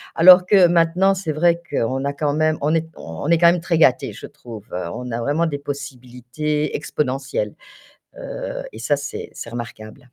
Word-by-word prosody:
alors 180 +2 +8
que 185 -2 +6
maintenant, 175 +3 +3
c'est 185 -5 -3
vrai 170 +2 +2
qu'on 130 0 -1
a 140 - 0
quand 145 0 -1
même 155 +1 +1
on 150 +3 +1
est 160 0 -1
on 80 - -7
est 170 - +5
quand 170 0 +6
même 175 -1 -1
très 170 -1 0
gâtés, 135 -6 +3
je - - -9
trouve. 110 -4 -11 0.3
On 125 0 -6
a 115 - -2
vraiment 150 +7 0
des 145 -3 -3
possibilités 140 +1 -4
exponentielles, 150 - -2 0.7
heu, - - -6
et - - -10
ça, 145 - +1
c'est 145 +1 -6
c'est - - -8
remarquable. 115 -2 -8
150 Hz, 185 wpm, -21 LUFS, 130-170 Hz, 0.7 s, alors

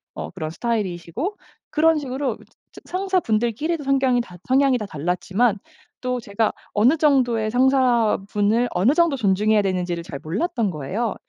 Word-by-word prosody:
어 - - -6
그런 160 -3 -5
스타일이시고 210 - -3 0.4
그런 320 +1 +3
식으로 265 -2 -2
이 - - -17 0.3
저 - - -13
상사분들끼리도 315 - -1
성걍이 265 -3 +2
다 180 -6 -11
성향이 265 0 +3
다 215 - -4
달랐지만 190 +7 0 0.4
또 250 -1 -1
제가 215 -1 -1 0.2
어느 245 +10 +4
정도의 245 -7 +2
상사분을 235 -3 +2
어느 205 +11 +3
정도 335 -3 +3
존중해야 210 -2 +2
되는지를 180 -3 -2
잘 145 -4 -7
몰랐던 215 - -1
거예요. 185 - -3
230 Hz, 350 characters per minute, -22 LUFS, 195-270 Hz, 0.4 s, 어느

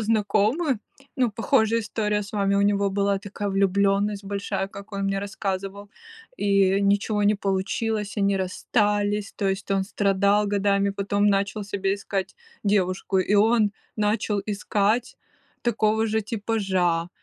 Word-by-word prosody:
знакомый, 220 +7 +1 0.4
ну, 250 -3 +2
похожая 230 0 +2
история 210 -1 -1
с 200 - -10
вами. 200 -1 +1
У 200 - +3
него 200 0 +2
была 200 0 0
такая 205 +1 -5
влюбленность 200 +1 +1
большая, 200 -1 -3
как 200 +1 -11
он 200 - -3
мне 195 0 0
рассказывал, 200 0 -4 0.5
и 195 -1 +3
ничего 205 +1 +1
не 210 - +4
получилось, 200 +2 -2
они 200 -1 +2
расстались. 205 +2 0
То 200 -2 0
есть, 195 +1 -3
он 195 - +2
страдал 200 +1 +2
годами, 200 0 +1
потом 200 +1 0
начал 200 +1 0
себе 195 -1 -1
искать 195 -2 -4 0.3
девушку, 190 -1 +1
и 190 +2 +1
он 215 0 +4 0.2
начал 210 -1 0
искать 210 +2 0 0.5
такого 220 -1 +1
же 220 +1 0
типажа, 195 -6 -1
200 Hz, 135 wpm, -24 LUFS, 195-210 Hz, 0.5 s, не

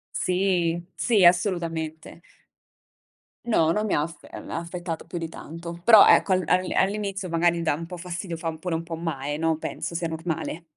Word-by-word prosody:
Sì, 180 -2 +1
sì 215 -6 +3
assolutamente. 170 -3 +1 1.2
No, 165 -9 +3
non 210 +3 0
mi - - 0
ha - - +2
aspe 165 +2 -8
uhm, - - -9
aspettato 170 0 -5
più 175 - -6
di 165 -1 -4
tanto, 170 +2 -9
però 220 -1 +8
ecco 190 - +5
al 185 -1 +2
al 185 0 +2
all'inizio 200 -1 0
magari 170 0 +2
dà 160 -3 +1
un 165 +2 -6
po' 180 0 -8
fastidio, 175 0 -5
fa 165 -1 -4
pure 165 0 -3
un 165 - -5
po' 165 -1 -6
male, 145 -3 -3
no. 160 0 +1
Penso 170 - -4
sia 170 0 -2
normale. 165 0 -4
170 Hz, 180 wpm, -25 LUFS, 165-185 Hz, 1.2 s, però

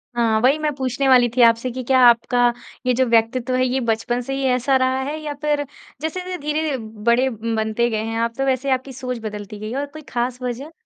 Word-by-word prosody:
हाँ, 225 -2 +2
वही 265 +5 +4
मैं 305 -1 0
पूछने 265 0 -1
वाली 250 -2 +6
थी 255 - +3
आपसे 230 +2 +4
कि 255 +1 -5
क्या 260 +1 +3
आपका 240 +1 +3 0.3
ये 250 - +3
जो 260 +2 +2
व्यक्तित्व 235 +2 +1
है 255 0 +2
ये 255 +1 0
बचपन 240 +2 0
से 270 +2 -5
ही 275 - -3
ऐसा 255 +2 +1
रहा 260 0 +1
है 305 - -4
या 300 -1 -4
फिर 295 -1 +1 0.4
जैसे-जैसे 365 +3 -4
धीरे 300 -1 -1
ध - - -8 0.2
बड़े 240 +3 +3
बनते 225 0 -1
गए 215 -1 -2
हैं 225 0 -3
आप 230 0 0
तो 270 - 0
वैसे 265 +1 0
आपकी 260 +1 -1
सोच 250 -1 -4
बदलती 210 -1 -7
गई 215 +1 -5
है 255 - -3
और 285 - -2
कोई 300 +2 -11
ख़ास 245 +1 -2
वजह? 250 +5 -5
255 Hz, 230 wpm, -21 LUFS, 235-270 Hz, 0.4 s, वाली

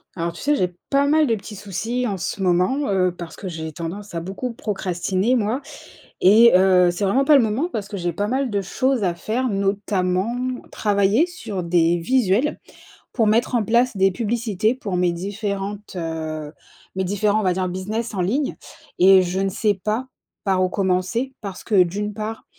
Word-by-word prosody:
Alors, 170 -1 -2
tu - - -10
sais, 295 +1 +2
j'ai 180 -7 0 0.2
pas 280 0 +3
mal 305 +1 +3
de 230 - +2
petits 210 +1 -9
soucis 220 +6 -3
en 200 - -2
ce 190 - -4
moment, 185 +7 +2
heu, 185 -2 +2
parce 170 -2 -8
que 190 - -7
j'ai 160 -2 -5
tendance 175 +5 -7
à - - 0
beaucoup 195 +8 -5
procrastiner, 195 +1 -1
moi 230 +3 0 0.6
et 225 +5 +7
heu, 185 -1 +5
c'est 190 +4 -2
vraiment 250 +8 +2
pas 300 - +6
le 270 - +5
moment 230 +11 -1
parce 210 -7 -4
que 210 - -6
j'ai 175 -1 -1
pas 205 +5 -1
mal 260 +3 0
de 200 -2 -1
choses 255 +5 0
à 175 -2 0
faire, 230 +9 -2
notamment, 195 0 0 0.4
travailler 205 - +2
sur 225 - -6
des 170 0 +2
visuels 240 - +1 0.5
pour 225 -4 +2
mettre 230 +4 +2
en 230 - +2
place 235 +3 +2
des 195 0 +4
publicités 220 +1 0
pour 205 -8 -4
mes 180 -1 +2
différentes, 200 +2 -4
heu, 160 -3 -4 0.4
mes 190 - 0
différents, 205 +3 +1
on - - -2
va 185 - +3
dire: 185 0 -1
«business 210 +6 -4
en 185 - 0
ligne» 265 +10 -1 0.4
et 190 +1 +7
je 180 +1 -2
ne 195 0 0
sais 210 +2 +1
pas 220 +5 -1 0.4
par 190 -2 +2
où 185 - -1
commencer, 195 +7 -1
parce 195 -3 -7
que, 200 -5 +4
d'une 205 +4 -4
part, 215 +2 -5
200 Hz, 190 wpm, -22 LUFS, 185-230 Hz, 0.6 s, et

